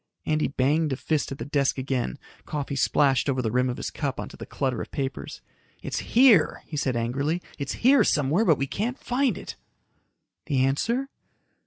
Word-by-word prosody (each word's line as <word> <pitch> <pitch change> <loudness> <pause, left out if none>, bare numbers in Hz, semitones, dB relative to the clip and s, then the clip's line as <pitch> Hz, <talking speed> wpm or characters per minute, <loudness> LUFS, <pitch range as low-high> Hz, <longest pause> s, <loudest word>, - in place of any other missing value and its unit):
Andy 155 0 +1
banged 145 +3 +1
a - - +1
fist 150 +2 -1
at 135 - -6
his 115 - -5
desk 140 -2 +1
again. 130 - -2 0.3
Coffee 145 -2 -3
splashed 135 0 +2
over 130 -1 0
the 115 -4 -1
rim 125 +1 +2
of 125 - -3
his - - -4
cup 140 -3 -3
onto - - -6
the - - -9
clutter 130 -4 -2
of - - -7
papers. 135 -1 -5 0.4
"It's - - -2
here," 235 -9 +4
he 155 - -8
said 135 -4 0
angrily. 140 +8 -1 0.2
"It's 140 - -4
here 270 -4 +7
somewhere, 150 +5 +2
but 160 -9 +4
we 135 - 0
can't 225 - -3
find 255 +1 0
it." - - -8 0.9
"The 130 -4 +2
answer?" 235 - 0
140 Hz, 185 wpm, -26 LUFS, 130-160 Hz, 0.9 s, here